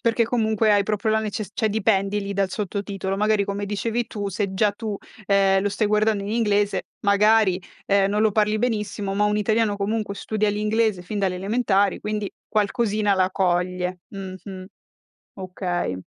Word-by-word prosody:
perché 230 0 +2
comunque, 220 -2 +1
hai 200 -1 +3
proprio 210 +1 0
la 220 - +3
neces 215 -2 -4
cioè, 220 - +1
dipendi 205 -1 +1
lì 200 0 -4
dal 195 -1 0
sottotitolo. 195 -1 -3
Magari, 210 0 +2
come 200 +1 -3
dicevi 225 +3 -2
tu, 205 -2 -4
se 195 0 -2
già 210 +2 +3
tu, 210 0 -5 0.3
ehm, 195 -1 +4
lo 205 - 0
stai 210 +1 0
guardando 210 -1 +2
in 200 - -4
inglese 205 -3 +1 0.2
magari, 205 -2 +4 0.3
ehm, 195 -1 +3
non 210 +1 +1
lo 220 - +4
parli 210 +1 +1
benissimo 210 -4 -2
ma 205 +1 +1
un 210 0 +1
italiano, 215 0 +1
comunque, 205 0 -2
studia 215 +1 -1
l'inglese 210 -1 0
fin 205 +4 -5
dalle 190 -2 0
elementari 200 0 +1
quindi, 210 -1 -3 0.2
qualcosina 210 -1 +1
la 185 -1 +2
coglie. 180 0 0
Mh-mh. 190 -1 -8 0.7
Okay. 180 - -3
205 Hz, 170 wpm, -23 LUFS, 195-215 Hz, 0.7 s, ehm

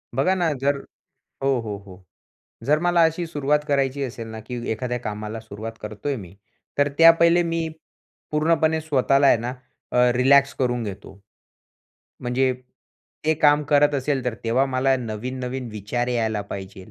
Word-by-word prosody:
बघा 145 +8 +2
ना, 175 -4 +1
जर 140 +1 0 0.7
हो, 135 -2 +2
हो, 105 -3 -5
हो. 95 0 -14 0.6
जर 150 +2 +3
मला 175 -1 +3
अशी 165 +1 0
सुरुवात 150 -2 +1
करायची 140 0 +1
असेल 115 -3 -6
ना, 110 0 -7
की 125 +1 -6
एखाद्या 125 +2 -3
कामाला 105 0 -5
सुरुवात 110 +1 -8
करतोय 105 +7 -4
मी, 95 -5 -10 0.4
तर 145 - +4
त्या 165 0 +10
पहिले 170 +1 +5
मी 165 -1 -1 0.6
पूर्णपणे 160 +1 +2
स्वतःला 140 -2 +2
आहे - - +6
ना, 120 +2 -4 0.4
अ, - - -1 0.2
रिलॅक्स 140 +2 +5
करून 125 -2 0
घेतो. 100 0 -8 1.0
म्हणजे 130 +1 +1 0.7
ते 160 0 +3
काम 150 0 +4
करत 145 0 +5
असेल 135 -1 -1
तर, 125 -2 -1
तेव्हा 120 +4 +2
मला 130 0 +2
नवीन-नवीन 125 +2 -5
विचार 110 +4 -3
यायला 110 -3 0
पाहिजेल. 95 -1 -8
130 Hz, 155 wpm, -23 LUFS, 115-145 Hz, 1.0 s, त्या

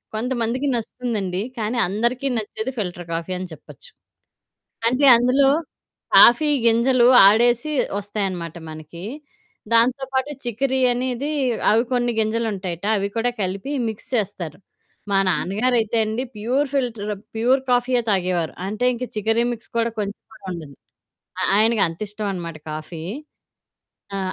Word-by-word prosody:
కొంతమందికి 245 +3 -1
నచ్చుతుందండి. 215 -5 -3 0.2
కానీ 220 +3 -2
అందరికీ 235 +7 -1
నచ్చేది 220 +3 -4
ఫిల్టర్ 175 -3 -4
కాఫీ 165 +2 -3
అని 185 0 -5
చెప్పచ్చు. 475 - -14 1.0
అంటే 265 +3 +2
అందులో 255 +3 +4 0.7
కాఫీ 295 +6 +7 0.2
గింజలు 240 +2 +4 0.2
ఆడేసి 240 +7 +3 0.3
ఒస్తాయనమాట 190 -5 -4
మనకి 155 +3 -10 0.7
.దాంతో 245 +4 +3
పాటు 265 +3 0
చికిరి 260 +3 -1
అనేది 255 +3 -2 0.4
అవి 225 +2 +4
కొన్ని 245 -1 +1
గింజలుంటాయట 205 -5 -2
అవి 200 0 -1
కూడా 235 +2 +1
కలిపి 195 +9 -3 0.2
మిక్స్ 220 +5 -7
చేస్తారు.మా 195 +1 -5
నాన్నగారయితే 220 +5 0
అండి 220 +4 -2
ప్యూర్ 255 +7 0
ఫిల్టర్ 225 -6 -1 0.2
ప్యూర్ 255 +4 +3
కాఫీయె 245 0 +2
తాగేవారు. 180 -4 0
అంటే 215 +5 -2
ఇంక 245 - -5
చికరి 225 +3 +1
మిక్స్ 230 - -12
కూడా 230 0 +1
కొంచెం 205 0 -3
కూడా 195 - -16
ఉండదు. 155 -5 -9 0.8
ఆయనకంతిష్టమనమాట 200 -4 0 0.2
కాఫీ. 155 +1 -7 1.1
ఆ! - - -2
225 Hz, 115 wpm, -22 LUFS, 195-245 Hz, 1.1 s, కాఫీ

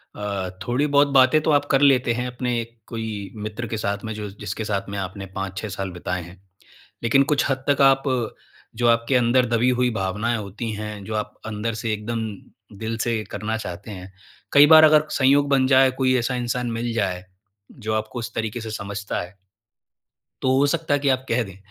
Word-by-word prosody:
अ, 100 -3 -3 0.2
थोड़ी 130 +5 +1
बहुत 145 0 +4
बातें 130 +3 +6
तो 155 - +1
आप 145 -1 +3
कर 135 0 +3
लेते 130 -4 +4
हैं 125 +2 -2
अपने 125 -1 -2 0.2
कोई 110 -3 -5
मित्र 110 +3 -5
के 110 - -3
साथ 100 -1 -2
में 110 - -4
जो 105 -1 -6
जिसके 100 +4 -4
साथ 100 -2 -2
में 100 - -5
आपने 95 +1 -5
5-6 95 +2 -4
साल 95 -1 -4
बिताएँ 90 0 -4
हैं। 90 +2 -14 0.6
लेकिन 135 +4 +4
कुछ 140 - +2
हद 130 0 -1
तक 140 0 +3
आप 135 0 +5 0.7
जो 120 +1 +1
आपके 115 +3 +2
अंदर 125 +1 +4
दबी 120 +2 +2
हुई 125 - +3
भावनाएँ 105 +3 -1
होती 105 +3 -5
हैं, 105 -1 -6
जो 110 - -4
आप 105 - -3
अंदर 110 +1 -3
से 110 0 -2
एकदम 110 +2 -3 0.5
दिल 110 0 -3
से 115 -2 -1
करना 110 +1 -3
चाहते 100 0 -7
हैं, 95 -1 -9 0.4
कई 145 +1 +8
बार 155 0 +9
अगर 155 0 +6
संयोग 140 +1 +3
बन 135 -2 +3
जाए, 130 -1 +5
कोई 130 0 +1
ऐसा 125 +2 -1
इंसान 120 0 -2
मिल 115 +1 -2
जाए, 95 -4 -2 0.5
जो 110 -3 -4
आपको 110 +3 -3
उस 115 - -6
तरीके 110 +1 -3
से 110 - -6
समझता 100 -1 -4
है 90 +3 -10 1.1
तो 130 0 +3
हो 145 - +4
सकता 145 +1 0
है 145 - +1
कि 140 - +1
आप 130 -1 +1
कह 120 +1 +2
दें। 95 -2 -11
115 Hz, 200 wpm, -23 LUFS, 105-130 Hz, 1.1 s, बार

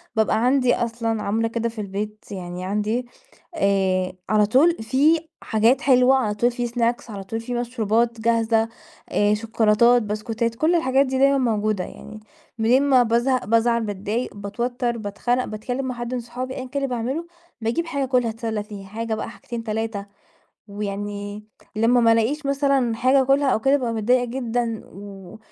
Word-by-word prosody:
بابقى 220 +1 +2
عندي 255 -1 +3
أصلًا 230 -2 -2
عاملة 225 +3 0
كده 230 0 -2
في 225 -2 -6
البيت 210 +2 -5
يعني 180 -1 -6
عندي 210 +5 -1 0.5
آآ، 190 - +1 0.2
على 215 -1 +4
طول 290 +11 +4
في 280 +8 +3 0.2
حاجات 225 +4 +2
حلوة، 255 -1 +5
على 230 -6 0
طول 240 +4 +2
في 245 0 -2
snacks، 235 0 -1
على 200 -2 -6
طول 225 +4 -4
في 245 +2 -5
مشروبات 235 -1 0
جاهزة، 225 0 +2 0.4
آآ، 205 0 +2
شوكولاتات، 225 +2 +3
بسكوتات، 225 +2 -2
كُلّ 320 +7 +2
الحاجات 275 -4 +3
دي 260 0 -2
دايمًا 275 0 +4
موجودة، 215 -6 0
يعني 215 +4 -10 0.4
منين 240 +5 +3
ما 265 -3 +5
بازهق، 240 +3 +1
بازعل، 230 +2 +2
باتضايق، 210 +3 -3
باتوتر، 235 +4 -2
باتخنق 240 +4 -1
باتكلم 245 +5 -4
مع 255 - -3
حد 240 +1 -5
من 250 - -1
صحابي 250 +2 -6
أيًا 260 - -5
كان 280 +2 -3
اللي - - +1
باعملُه، 265 +9 -3 0.3
باجيب 235 +10 -1
حاجة 285 -4 -2
آكُلها 250 -3 +1
أتسلّى 220 -2 -3
فيها، 200 -2 -10
حاجة 225 +2 -4
بقى 220 - -5
حاجتين 235 0 -7
3 220 -2 -3 0.6
ويعني 205 0 -5 0.3
لمّا 235 +3 +4
ما 230 -1 +5
ألاقيش 255 +7 0
مثلًا 275 -4 +1
حاجة 260 +3 +3
آكُلها 275 +2 +2
أو 220 - +1
كده، 270 +4 +4
بابقى 245 -4 -2
متضايقة 245 +3 +2
جدًا، 235 -2 -2
و 195 0 -11
230 Hz, 165 wpm, -23 LUFS, 215-250 Hz, 0.6 s, حلوة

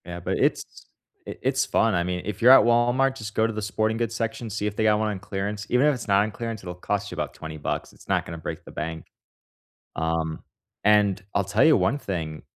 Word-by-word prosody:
Yeah, 85 0 -6
but 85 - -2
it's - - -1 0.4
it - - -8
it's 135 +1 +1
fun. 115 -4 +2
I 85 - +1
mean, 90 0 -2
if 105 0 -5
you're 125 +2 +8
at 135 - +9
Walmart, 120 +3 +3
just 110 -3 -7
go 110 - +3
to 115 - -4
the 110 - -4
sporting 110 +1 -1
goods 115 -1 -2
section, 115 0 -3
see 105 0 -3
if 105 - -4
they 110 - 0
got 105 -1 +4
one 110 0 0
on 100 -3 -4
clearance. 100 +1 -4
Even 125 +3 +3
if 150 - +4
it's 120 - -8
not 100 0 +4
on 110 - -3
clearance, 115 -1 -5
it'll 90 -1 -6
cost 100 +3 -3
you - - -6
about - - -3
20 80 -1 -8
bucks. 75 - -4
It's - - -19
not - - +1
gonna 85 - -7
break 80 - -6
the - - -11
bank. 80 0 -5 0.9
Um, 80 -1 -1 0.4
and 100 -2 +4
I'll 100 - +2
tell 100 - +2
you 160 -1 +6
one 140 - +1
thing, 80 - -4
105 Hz, 245 wpm, -25 LUFS, 90-115 Hz, 0.9 s, at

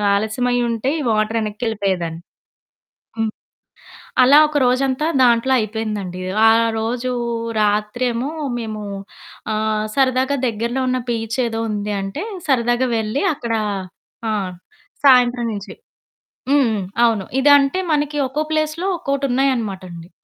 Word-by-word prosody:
ఆలస్యమై 245 +4 0
ఉంటే 230 +3 -1
ఈ - - -3
వాటర్ 215 +1 +1
యెనక్కెళ్ళిపోయేదని." 200 -6 -2 1.0
హ్మ్. 225 -1 0 0.9
అలా 265 +3 +7
ఒక 300 -1 -1
రోజంతా 260 +3 +1
దాంట్లో 245 +1 +4
అయిపోయిందండి. 210 -4 -3 0.3
ఆ - - +7 0.3
రోజూ 240 +3 -2 0.5
రాత్రేమో 230 +5 0 0.3
మేము, 215 -2 -5 0.7
ఆహ్, 215 0 0
సరదాగా 260 +1 +2
దగ్గరలో 235 +3 -1
ఉన్న 255 0 0
బీచ్ 225 -1 -2
ఏదో 225 -1 -3
ఉంది 210 0 -2
అంటే, 195 - -4 0.2
సరదాగా 245 -2 +2
వెళ్లి 220 - -1
అక్కడ 235 -5 -4 0.8
ఆ! - - 0 0.7
సాయంత్రం 250 -2 +5
నుంచి. 200 -1 -7 0.8
హ్మ్, 285 -1 +5
హ్మ్, 210 -3 -1 0.2
అవును. 220 -5 +1 0.2
ఇదంటే 285 +3 +5
మనకి 295 0 0
ఒక్కో 290 +4 -2
ప్లేస్‌లో 310 +4 -1
ఒక్కోటున్నాయనమాటండి. 245 - -1
235 Hz, 110 wpm, -20 LUFS, 215-265 Hz, 1.0 s, అలా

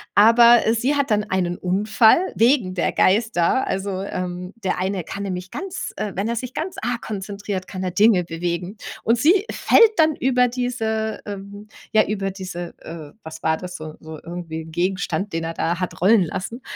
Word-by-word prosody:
Aber 235 +3 +7
sie 255 +6 +1
hat 280 -3 0
dann 210 0 +3
einen 180 -3 -1
Unfall 215 - +3
wegen 230 -6 +3
der 175 - 0
Geister. 215 +2 +2
Also, 190 0 -2
ähm, 180 0 -5
der 185 - 0
eine 190 -1 -1
kann 200 +5 -6
nämlich 185 -1 -4
ganz 380 -1 -5
wenn 200 0 -2
er 235 - -1
sich 255 +1 -5
ganz 335 +4 -4
arg 245 0 -2
konzentriert, 200 -2 -5
kann 185 -1 -6
er 185 - -1
Dinge 205 -1 +4
bewegen. 175 +4 -4 0.3
Und 230 +1 +3
sie 375 - +4
fällt 460 -2 +5
dann 315 -2 +4
über 250 -1 +2
diese 225 -3 -2
ähm, 200 +1 -8 0.3
ja, 215 - +6
über 195 -2 -2
diese 180 -2 -7
äh, 160 -3 -9
was 160 0 -9
war 160 0 +2
das, 180 0 -8
so 155 0 -8
so 155 -1 -9
irgendwie 165 -2 -6
Gegenstand, 185 +3 -2
den 165 0 -2
er 165 - -4
da 170 +2 -1
hat 180 - -4
rollen 200 0 +5
lassen. 200 +7 -5
200 Hz, 180 wpm, -22 LUFS, 180-230 Hz, 0.3 s, Aber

